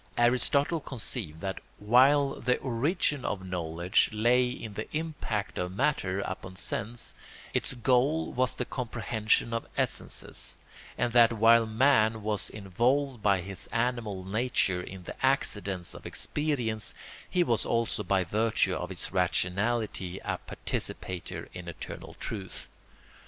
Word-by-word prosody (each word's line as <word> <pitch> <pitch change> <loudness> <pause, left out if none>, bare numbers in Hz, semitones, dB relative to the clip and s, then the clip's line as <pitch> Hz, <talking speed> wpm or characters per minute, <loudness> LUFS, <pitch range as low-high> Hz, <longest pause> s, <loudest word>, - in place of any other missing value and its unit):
Aristotle 140 +6 +3
conceived 110 - -4
that 95 -1 -3 0.2
while 135 +6 +4
the 125 0 +2
origin 140 +3 0
of 95 -2 -3
knowledge 85 +1 +1
lay 120 +3 +3
in 110 -3 -6
the 110 +2 -5
impact 150 -10 -3
of 90 +1 -3
matter 100 -7 +1
upon 95 -1 -5
sense 115 +2 -3 0.4
its - - -1
goal 130 +6 +2
was 130 +1 +1
the 125 - -2
comprehension 115 -2 0
of 115 - -2
essences, - - -2 0.4
and 120 -1 0
that 120 -1 +7
while 115 +1 +5
man 110 -2 +3
was 105 -3 -1
involved 120 +6 0
by 100 -3 +3
his 95 +1 -5
animal 115 -5 -1
nature 100 -3 +1
in 95 0 -9
the - - -9
accidents 105 -9 +1
of - - -9
experience 125 -8 -1 0.3
he 180 - +3
was 115 -9 +1
also 115 -2 0
by 95 0 +2
virtue 110 +5 +2
of - - -3
his - - -4
rationality 95 +1 0
a - - -1
participator 90 -2 -4
in 90 -1 -8
eternal 85 - -8
truth. 95 -4 -5
115 Hz, 130 wpm, -29 LUFS, 95-125 Hz, 0.4 s, that